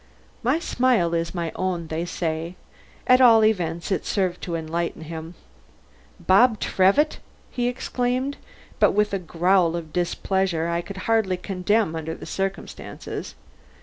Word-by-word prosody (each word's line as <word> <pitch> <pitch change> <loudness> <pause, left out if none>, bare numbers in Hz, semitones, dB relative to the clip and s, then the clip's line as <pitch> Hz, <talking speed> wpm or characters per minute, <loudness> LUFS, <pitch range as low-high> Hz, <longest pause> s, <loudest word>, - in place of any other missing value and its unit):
My 255 +5 +2
smile 245 - +1
is 165 +1 -1
my 170 -2 -2
own, 180 -2 -2
they 160 +2 -3
say; 165 0 -3 0.5
at 255 0 +5
all 225 -3 +7
events 170 -4 0
it 185 - 0
served 185 -3 -1
to 170 - -3
enlighten 165 0 -3
him. 160 +1 -7 0.8
"Bob 215 +3 +4
Trevitt," 200 +12 +2 0.3
he 245 -2 -1
exclaimed, 250 +2 -1 0.4
but - - +5
with 210 0 +1
a 195 - 0
growl 175 0 +2
of 160 -2 -6
displeasure 180 -1 0
I 170 0 0
could 190 +1 -8
hardly 220 -5 +2
condemn 190 0 0
under 160 0 -4
the - - -10
circumstances. 195 0 -5
185 Hz, 140 wpm, -24 LUFS, 170-220 Hz, 0.8 s, all